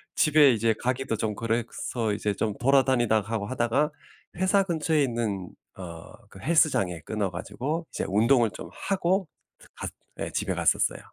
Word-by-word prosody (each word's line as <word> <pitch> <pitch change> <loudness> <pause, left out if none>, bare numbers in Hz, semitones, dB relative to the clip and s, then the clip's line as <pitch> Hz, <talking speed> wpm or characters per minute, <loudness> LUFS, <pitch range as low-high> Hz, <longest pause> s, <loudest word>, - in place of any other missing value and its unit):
집에 150 -3 +6
이제 115 0 +2
가기도 125 -2 -1
좀 105 0 -2
그래서 115 0 -2
이제 105 0 -1
좀 105 +1 -2
돌아다니다 125 -4 +3
하고 105 0 -3
하다가 130 +5 +1 0.5
회사 190 +2 +3
근처에 160 -4 +1
있는 110 -7 -2 0.3
어 85 -3 -9 0.2
그 95 - -14
헬스장에 100 - +2
끊어 105 +4 -2
가지고 145 - -4
이제 - - -3
운동을 115 +4 +4
좀 - - -9
하고 190 -1 0 0.5
갔 - - -5 0.3
네 - - -4
집에 - - -1
갔었어요. - - +2
120 Hz, 315 characters per minute, -27 LUFS, 105-150 Hz, 0.5 s, 집에